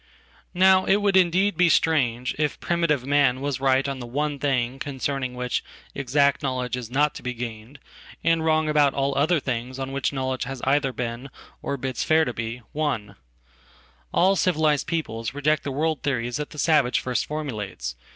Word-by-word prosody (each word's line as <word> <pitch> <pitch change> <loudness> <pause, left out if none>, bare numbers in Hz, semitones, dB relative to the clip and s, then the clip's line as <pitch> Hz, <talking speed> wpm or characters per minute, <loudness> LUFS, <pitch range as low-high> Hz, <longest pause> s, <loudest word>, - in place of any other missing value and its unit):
Now 190 +1 +5
it 195 - +4
would 205 -1 +1
indeed 190 +2 +3
be 175 +1 +4
strange 125 -7 +2
if 150 -2 0
primitive 165 -6 0
man 140 -2 +3
was 140 -1 -2
right 135 0 +2
onthe 130 -4 -4
one 145 +2 -2
thing 130 -2 0
concerning 135 -2 -3
which 125 -1 -2 0.3
exact 140 +1 +2
knowledge 125 -2 -2
is 125 -3 -6
not 145 +4 +2
to - - -9
be 125 -1 -4
gained, 115 +2 -7 0.5
and 165 -1 +2
wrong 155 -1 +2
about 150 -2 +3
all 140 0 0
other 155 +4 +2
things 130 -1 -4
on 135 0 -4
which 135 0 -1
knowledge 130 -2 -2
has 135 +1 -6
eitherbeen, 130 -3 -1 0.3
or 140 - -3
bids 130 -1 -3
fair 160 0 +3
to 125 - -3
be, 115 +2 -5
won. 125 -10 -2 1.0
All 190 +2 +4
civilized 155 -5 +1
peoples 130 -8 -3
reject 150 +1 +1
theworld 150 +1 -1
theories 120 -3 -1
that 150 0 -4
the - - -12
savage 145 -5 +3
first 125 -1 -2
formulates. 105 - -4
140 Hz, 170 wpm, -24 LUFS, 125-155 Hz, 1.0 s, Now